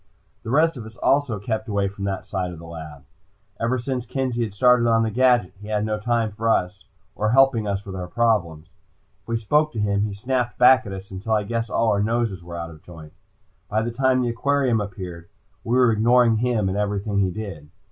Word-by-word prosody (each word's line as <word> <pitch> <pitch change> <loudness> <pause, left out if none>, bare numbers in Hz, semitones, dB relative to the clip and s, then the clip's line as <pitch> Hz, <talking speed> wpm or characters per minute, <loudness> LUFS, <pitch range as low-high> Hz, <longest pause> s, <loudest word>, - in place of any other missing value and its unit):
The - - -8
rest 155 +4 +3
of 115 - -7
us 110 - -13
also 135 -5 +1
kept 110 +2 -3
away 100 -2 0
from 100 0 -6
that 95 -2 -3
side 95 -2 -3
of 85 - -9
the 85 - -11
lab. 80 -4 -10 0.5
Ever 115 +3 0
since 125 0 -3
Kenzie 130 -2 -2
had 105 -3 -5
started 125 +1 +4
on 115 0 +3
the 110 - -1
gadget, 120 -5 +3
he 105 - -9
had 105 -1 -1
no 110 -1 -2
time 115 0 0
for 115 +2 -2
us, 95 -2 0 0.3
or 105 - 0
helping 125 -3 +4
us 100 0 -2
with 95 -1 -7
our 90 -1 -5
problems. 90 -7 0 0.5
If 95 - -41
we 115 0 0
spoke 150 +8 +1
to 115 - -4
him 100 -1 +1
he 105 -1 -2
snapped 125 +3 -2
back 125 -1 +6
at - - -6
us, 95 0 -8
until 100 +4 -3
I 105 -1 +2
guess 115 +1 -3
all 115 -1 +1
our 100 - +1
noses 110 -4 -1
were 85 0 -8
out 85 0 -5
of 75 -2 -14
joint. 80 -3 -13 0.6
By 110 +2 0
the 120 - -2
time 130 +1 +2
the 120 - 0
aquarium 125 -1 +1
appeared, 90 -4 -7 0.3
we 120 - 0
were 125 -2 +5
ignoring 115 +1 +4
him 115 -3 0
and 95 +2 -1
everything 100 0 -1
he 95 -1 +2
did. 90 -7 -7
110 Hz, 225 wpm, -23 LUFS, 95-120 Hz, 0.6 s, back